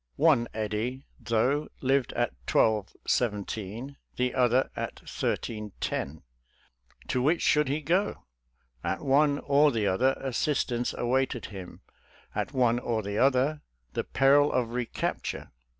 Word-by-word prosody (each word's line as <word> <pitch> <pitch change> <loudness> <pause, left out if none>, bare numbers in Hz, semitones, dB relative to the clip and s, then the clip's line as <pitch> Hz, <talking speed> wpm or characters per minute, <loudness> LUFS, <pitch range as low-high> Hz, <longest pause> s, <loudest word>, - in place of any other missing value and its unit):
One 140 -6 +4
Eddy, 110 +5 -3
though, 130 +6 +1
lived 135 0 +1
at 120 -1 0 0.2
1217, 110 +3 0 0.2
the 125 0 0
other 125 +1 +2
at - - -5
1310 105 -8 -3 0.4
— - - -29
to 125 - +1
which 155 +6 +2
should 150 0 +3
hte 145 +2 -2
go? 185 +7 0 0.6
At 90 +2 -2
one 145 +1 +3
or: 145 +1 +4
the 110 -4 0
other, 125 +8 +2
assistance 130 -2 -1
awaited 125 0 0
him— 95 -2 -9 0.5
at - - -2
one 120 -3 +2
or 115 -3 -1
the 100 +1 -2
other, 135 +3 +3 0.3
the - - -1
peril 140 +2 +4
of 120 -2 0
recapture. 120 -1 -3
125 Hz, 125 wpm, -28 LUFS, 110-140 Hz, 0.6 s, One